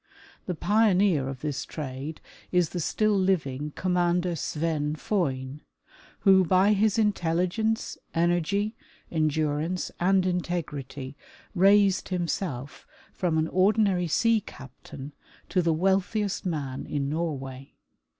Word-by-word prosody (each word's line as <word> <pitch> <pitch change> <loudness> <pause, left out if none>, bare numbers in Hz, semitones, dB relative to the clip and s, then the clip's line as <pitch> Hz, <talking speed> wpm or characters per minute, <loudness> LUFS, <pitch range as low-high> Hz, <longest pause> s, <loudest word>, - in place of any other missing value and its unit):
The 180 - -2
pioneer 195 -7 +3
of 135 -1 -7
this 145 -4 -3
trade 145 +1 -6 0.3
is 180 -3 +2
the 180 - -4
still 215 +5 +1
living 150 -7 0
Commander 180 -1 +1
Sven 155 -1 -1
Foyn, 150 - -2 0.6
who, 190 -2 +6
by 190 +4 +4
his 210 +1 +2
intelligence, 205 +2 0 0.2
energy, 175 +6 +1 0.4
endurance 155 +2 0
and 190 +1 +3
integrit.y, 150 -7 -3 0.4
raised 195 0 +4
himself 170 -7 -3 0.3
from 170 -4 0
an 160 0 +1
ordinary 190 -2 +2
sea 225 +7 +3
captain 135 +2 -11 0.4
to 185 - +2
the 165 -1 +2
wealthiest 195 +4 0
man 140 -6 -3
in 140 -2 -2
Norway. 135 -4 -4
175 Hz, 110 wpm, -27 LUFS, 150-195 Hz, 0.6 s, who